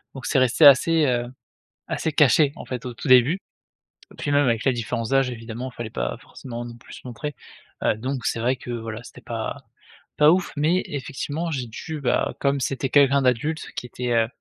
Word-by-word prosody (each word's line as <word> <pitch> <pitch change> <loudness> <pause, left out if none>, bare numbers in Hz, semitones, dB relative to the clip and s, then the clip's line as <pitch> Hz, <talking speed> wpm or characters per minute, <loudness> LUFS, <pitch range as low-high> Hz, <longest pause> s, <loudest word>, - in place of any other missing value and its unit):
Donc 130 - -8
c'est 135 - +2
resté 130 +4 +4
assez, 155 +3 +6
heu, 120 -2 0 0.6
assez 160 - -2
caché, 145 0 +4
en - - -8
fait, 125 -1 -5
au 125 - -5
tout 135 - -6
début. 130 +4 +6 0.8
Et - - -15
puis, - - -3
même 145 0 +4
avec 115 -2 +1
la 135 - +3
différence 115 -1 -3
d'âge, 135 -1 +2
évidemment, 120 +2 -6
fallait 120 -2 -6
pas - - -3
forcément 120 -2 -8
non 120 -1 -9
plus - - -15
se - - -10
montrer. 150 +5 -5 0.5
Heu, - - +2
donc 130 +3 -4
c'est - - -1
vrai 125 +3 +1
que 125 - -11
voilà, 115 -1 -5
c'était - - -13
pas 115 -2 -4 0.6
pas 150 +1 +7
ouf 185 +1 0
mais 165 +5 +2
effectivement 145 +4 -4
j'ai 130 -5 -3
dû, 155 +7 -6
bah, 130 - 0
comme 140 0 +1
c'était 135 +1 -1
quelqu'un 140 0 +5
d'adulte 130 +6 0
qui - - -5
était, 125 0 -4
heu 115 -1 +3
130 Hz, 205 wpm, -23 LUFS, 120-145 Hz, 0.8 s, pas